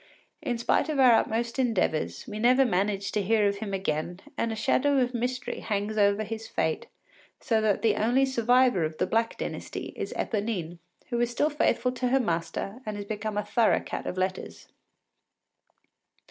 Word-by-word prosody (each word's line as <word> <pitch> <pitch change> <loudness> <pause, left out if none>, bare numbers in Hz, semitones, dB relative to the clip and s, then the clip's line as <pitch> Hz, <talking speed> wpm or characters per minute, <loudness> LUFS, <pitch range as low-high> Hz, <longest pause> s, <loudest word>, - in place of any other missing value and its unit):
In 250 -6 -2
spite 235 +6 +1
of 305 - -1
our 255 -2 +7
utmost 230 +2 +1
endeavours, 220 -11 0
we 210 -2 -6
never 255 +4 +5
managed 200 -2 0
to 210 - +1
hear 210 +1 +3
of 200 0 -1
him 205 -1 -5
again, 175 -2 -2 0.2
and 230 - -1
a - - -3
shadow 280 +6 +2
of 250 -1 +1
mystery 250 +1 -3
hangs 210 0 -2
over 200 0 +3
his 220 +1 -6
fate; 160 - -1 0.5
so 225 -2 +1
that 215 -2 +1
the 225 - +3
only 245 +5 +3
survivor 245 -5 +3
of 155 0 -3
the - - +1
Black 230 +1 0
Dynasty - - -5
is - - -4
Eponine, 200 -6 -3 0.3
who 240 - 0
is 240 - +2
still 295 +6 +1
faithful 275 -3 +1
to 250 0 -2
her 265 +2 +3
master 170 +2 -2
and 215 -3 -4
has 205 - -5
become 210 0 -4
a 210 - -1
thorough 230 -2 +3
cat - - -6
of 180 - -4
letters. 185 0 -3
220 Hz, 180 wpm, -27 LUFS, 200-245 Hz, 0.5 s, our